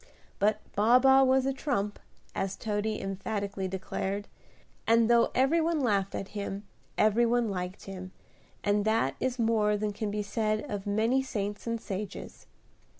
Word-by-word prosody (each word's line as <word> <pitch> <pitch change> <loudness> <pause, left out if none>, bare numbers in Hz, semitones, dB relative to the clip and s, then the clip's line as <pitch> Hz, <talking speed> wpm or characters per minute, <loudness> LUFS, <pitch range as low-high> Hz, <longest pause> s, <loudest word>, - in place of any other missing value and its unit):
But 210 +1 +2
Baa 220 +5 +6
baa 265 +1 +6
was 265 0 +4
a 270 - +1
"trump," 240 -7 -2 0.3
as 195 0 -2
Toady 215 +1 -2
emphatically 195 0 -3
declared, 190 +2 -3 0.6
and 230 0 +5
though 235 -1 +5
every 275 +6 +3
one 325 -1 +1
laughed 200 -7 +1
at 195 - -4
him, 200 -1 -5 0.3
every 215 +3 +4
one 240 -1 +2
liked 180 0 -4
him, 185 -1 -8 0.5
and 205 0 +2
that 220 -11 +1
is 255 -1 -1
more 220 -3 +2
than 210 0 -2
can 210 +1 -3
be 210 0 -2
said 215 +1 0
of 205 -1 -5
many 225 +6 +2
saints 210 -5 -4
and 230 0 -1
sages. 200 -1 -6
210 Hz, 155 wpm, -29 LUFS, 200-235 Hz, 0.6 s, Baa